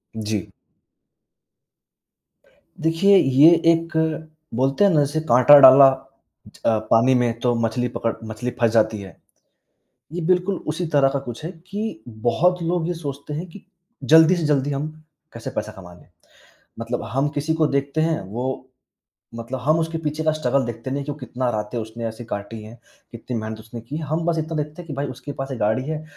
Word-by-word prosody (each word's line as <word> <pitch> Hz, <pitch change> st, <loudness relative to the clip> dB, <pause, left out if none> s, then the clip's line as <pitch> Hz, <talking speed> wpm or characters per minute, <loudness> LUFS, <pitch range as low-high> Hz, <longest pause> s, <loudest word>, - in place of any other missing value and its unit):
जी। 105 Hz, -3 st, -3 dB, 2.3 s
देखिए, 165 Hz, +5 st, +4 dB
ये 135 Hz, +3 st, +6 dB, 0.2 s
एक 160 Hz, -1 st, -2 dB, 0.3 s
बोलते 135 Hz, -, +1 dB
हैं 200 Hz, -, +5 dB
ना 155 Hz, -, +3 dB
जैसे 145 Hz, +2 st, 0 dB
काँटा 130 Hz, +4 st, +8 dB
डाला 135 Hz, 0 st, +9 dB, 0.6 s
ज -, -, -18 dB
अ, 110 Hz, -1 st, +3 dB
पानी 120 Hz, +3 st, +5 dB
में 120 Hz, -2 st, 0 dB
तो 120 Hz, 0 st, +1 dB
मछली 115 Hz, +2 st, -1 dB
पकड़ 115 Hz, -1 st, -2 dB
मछली 110 Hz, +3 st, -4 dB
फँस 115 Hz, -2 st, +3 dB
जाती 110 Hz, -1 st, +2 dB
है। 95 Hz, -3 st, -11 dB, 1.0 s
ये 175 Hz, -, -3 dB
बिल्कुल 185 Hz, +2 st, +1 dB
उसी 175 Hz, +3 st, -2 dB
तरह 135 Hz, -1 st, +5 dB
का 140 Hz, -, 0 dB
कुछ 120 Hz, +1 st, -9 dB
है 175 Hz, -, -4 dB, 0.2 s
कि 205 Hz, -, -5 dB, 0.2 s
बहुत 180 Hz, +8 st, +2 dB
लोग 170 Hz, 0 st, -1 dB
ये 175 Hz, -, -1 dB
सोचते 145 Hz, -3 st, -7 dB
हैं 165 Hz, +5 st, -5 dB
कि 195 Hz, -, -13 dB, 0.4 s
जल्दी 160 Hz, +3 st, +6 dB
से 165 Hz, -3 st, -2 dB
जल्दी 145 Hz, -1 st, +1 dB
हम 140 Hz, +2 st, -2 dB, 0.5 s
कैसे 115 Hz, -, -7 dB
पैसा 110 Hz, 0 st, -3 dB
कमा 90 Hz, -3 st, -13 dB
लें। 90 Hz, -, -19 dB, 0.7 s
मतलब 115 Hz, +2 st, -4 dB
हम 140 Hz, +2 st, +1 dB
किसी 150 Hz, +3 st, -1 dB
को 160 Hz, -1 st, +2 dB
देखते 140 Hz, +2 st, -1 dB
हैं, 160 Hz, -5 st, 0 dB
वो 125 Hz, +6 st, -5 dB, 0.7 s
मतलब 120 Hz, +3 st, -6 dB
हम 155 Hz, +5 st, +2 dB
उसके 165 Hz, 0 st, -2 dB
पीछे 155 Hz, 0 st, -3 dB
का 155 Hz, -, +2 dB
स्ट्रगल 135 Hz, -4 st, 0 dB
देखते 120 Hz, +2 st, -6 dB
नहीं 140 Hz, +1 st, -2 dB
कि 145 Hz, -, -5 dB
वह 145 Hz, -, -8 dB
कितना 125 Hz, -1 st, -3 dB
रातें 105 Hz, +2 st, -4 dB
उसने 110 Hz, +1 st, -6 dB
ऐसी 115 Hz, +2 st, -8 dB
काटी 105 Hz, +1 st, -6 dB
हैं, 115 Hz, +3 st, -12 dB, 0.3 s
कितनी 120 Hz, +1 st, -7 dB
मेहनत 110 Hz, 0 st, -5 dB
उसने 115 Hz, +1 st, -10 dB
की 135 Hz, +6 st, -7 dB
है। 160 Hz, -, -5 dB
हम 155 Hz, +3 st, -2 dB
बस 170 Hz, -1 st, 0 dB
इतना 160 Hz, +1 st, -4 dB
देखते 150 Hz, +3 st, -5 dB
हैं 175 Hz, -, -13 dB
कि 145 Hz, -, -6 dB
भाई 140 Hz, +1 st, -3 dB
उसके 130 Hz, +3 st, -8 dB
पास 135 Hz, 0 st, -6 dB
1 130 Hz, -, -4 dB
गाड़ी 110 Hz, +5 st, +1 dB
है। 155 Hz, -1 st, -4 dB
135 Hz, 190 wpm, -22 LUFS, 115-160 Hz, 2.3 s, डाला